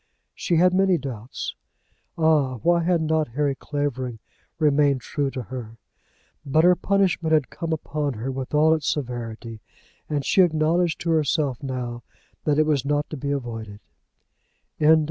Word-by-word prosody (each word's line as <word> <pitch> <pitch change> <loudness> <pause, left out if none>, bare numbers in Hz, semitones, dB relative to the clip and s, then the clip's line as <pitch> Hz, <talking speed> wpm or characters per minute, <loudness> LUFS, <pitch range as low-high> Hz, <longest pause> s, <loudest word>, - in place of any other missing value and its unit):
She 175 - -1
had 180 +2 +4
many 190 -1 +3
doubts. 125 -5 -6 0.6
Ah! 155 -5 +3
why 170 0 +4
had 170 -1 +1
not 155 0 +1
Harry 140 +4 0
Clavering 135 -4 -3 0.4
remained 145 -3 +3
true 140 +3 -2
to 130 -2 -5
her? 115 -3 -8 0.7
But 155 +3 +2
her 180 +1 +6
punishment 185 -4 +1
had 150 -4 +2
come 165 -1 -4
upon 150 -2 -2
her 120 +4 -4
with 130 -1 -5
all 155 +1 +4
its 155 -3 0
severity, 115 -4 -5 0.5
and 145 -3 -1
she 190 - +4
acknowledged 165 0 +2
to 165 - 0
herself 150 -4 +1
now 125 -3 -4 0.4
that 150 -1 +2
it 155 - +4
was 145 -4 +1
not 145 +1 -1
to - - -3
be 140 +2 -4
avoided. 115 -7 -4
145 Hz, 150 wpm, -24 LUFS, 130-160 Hz, 0.7 s, her